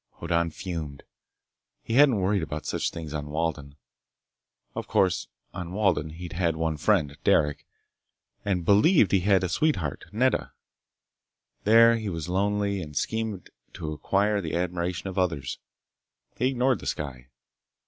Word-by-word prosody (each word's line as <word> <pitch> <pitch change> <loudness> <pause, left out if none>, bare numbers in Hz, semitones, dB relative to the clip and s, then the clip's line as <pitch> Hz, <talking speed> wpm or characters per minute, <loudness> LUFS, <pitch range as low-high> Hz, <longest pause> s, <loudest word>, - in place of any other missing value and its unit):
Hoddan 85 0 0
fumed. 80 -5 -6 0.8
He - - -4
hadn't 135 -1 +6
worried 95 +1 +1
about 75 -1 -5
such - - -1
things 80 -3 -7
on 75 -1 -4
Walden. 75 -2 -3 1.0
Of - - -5
course, 95 -2 +1 0.3
on 90 -1 -6
Walden 95 -7 +1
he'd 85 +3 -8
had 85 -2 0
one 80 -1 -1
friend, 75 -6 +1
Derec, 75 +1 +2 0.8
and 95 -4 -1
believed 105 - +5
he 95 - +4
had 95 +1 +3
a - - +1
sweetheart, 90 - -1
Nedda. 125 +5 +1 1.1
There 115 +2 +7
he 110 -2 -3
was 85 -2 -4
lonely 100 +1 0
and 75 -3 -7
schemed 110 -3 -2 0.2
to 80 -3 -5
acquire 100 +7 +1
the 80 -4 -3
admiration 90 +1 -2
of 95 0 -3
others. 80 -9 -1 0.8
He 125 - +1
ignored 130 0 +1
the - - -8
sky. 65 -4 -4
90 Hz, 140 wpm, -26 LUFS, 80-105 Hz, 1.1 s, There